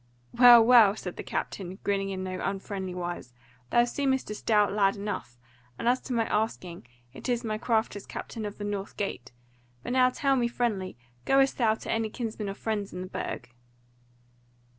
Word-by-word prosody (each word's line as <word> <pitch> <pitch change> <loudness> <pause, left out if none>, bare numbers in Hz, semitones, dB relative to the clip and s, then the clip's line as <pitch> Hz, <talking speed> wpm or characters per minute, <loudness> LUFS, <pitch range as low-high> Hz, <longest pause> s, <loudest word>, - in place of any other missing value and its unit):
"Well, 240 -2 +9
well," 225 -5 +7
said 180 -4 -7
the - - -4
captain, 190 -1 -4
grinning 195 -1 0
in 190 -1 -4
no 185 0 -4
unfriendly 195 -1 -4
wise, 175 -8 -5 0.3
"thou 240 - +4
seemest 265 -1 -1
a - - -2
stout 210 -1 +2
lad 200 -1 +3
enough; 200 -12 -5 0.4
and - - -3
as 250 +1 +3
to 255 - -5
my 230 -1 +1
asking, 185 - -2 0.3
it - - -7
is 240 0 0
my 215 -1 -2
craft 225 -2 0
as 205 - -8
captain 225 - -6
of 205 -1 -5
the 205 - -6
North 205 -1 -4
Gate: 135 -11 -4 0.5
but - - -3
now 255 -1 +5
tell 275 +1 +1
me 240 -2 +2
friendly, 215 - -2 0.3
goest 270 0 +3
thou 220 -3 +3
to - - -6
any 225 -1 0
kinsman 220 -3 -4
or 195 - -5
friend 210 -2 -3
in 180 - -6
the 185 - -5
Burg?" 125 -8 -5
210 Hz, 185 wpm, -28 LUFS, 195-240 Hz, 0.5 s, Well